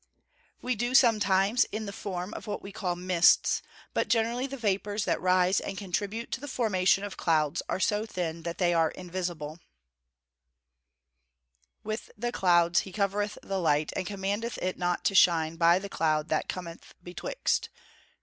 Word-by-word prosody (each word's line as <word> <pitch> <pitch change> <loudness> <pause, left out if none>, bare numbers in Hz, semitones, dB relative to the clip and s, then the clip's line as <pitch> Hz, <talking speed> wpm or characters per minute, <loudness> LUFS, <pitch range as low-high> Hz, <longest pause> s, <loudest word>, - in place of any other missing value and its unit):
_ - - -35 0.6
We 255 - 0
do, 240 +3 -1
sometimes, 210 -2 +4
in 215 +1 -5
the 200 - -6
form 185 0 -5
of - - -8
what 205 - -4
we 195 - -8
call 180 -3 -2
mists, 180 -1 +3 0.3
but - - 0
generally 235 +3 +1
the 275 0 -7
vapours 205 -2 -1
that - - 0
rise 185 +1 +3
and 195 - -6
contribute 205 +4 -3
to - - -3
the 290 - -6
formation 200 -7 +2
of 205 -2 -6
clouds 155 -3 +1
are - - -1
so 210 +3 0
thin 170 -5 -4
that 170 +1 -5
they 175 -2 +2
are 165 -1 +3
invisible. 175 -4 -5 2.3
[Verse: 215 +1 -4
"With 240 +3 -3
clouds 175 -2 +4
he 190 - -6
covereth 205 +1 -1
the 195 -1 -2
light, 150 -3 +1
and 185 - -2
commandeth 205 +4 -3
it 185 0 -2
not 175 -1 -1
to - - +2
shine 165 -4 +4
by 170 +1 +5
the 195 +2 -5
cloud 155 -4 0
that - - -1
cometh 170 -2 -7
betwixt." 180 - -2
190 Hz, 170 wpm, -28 LUFS, 175-210 Hz, 2.3 s, by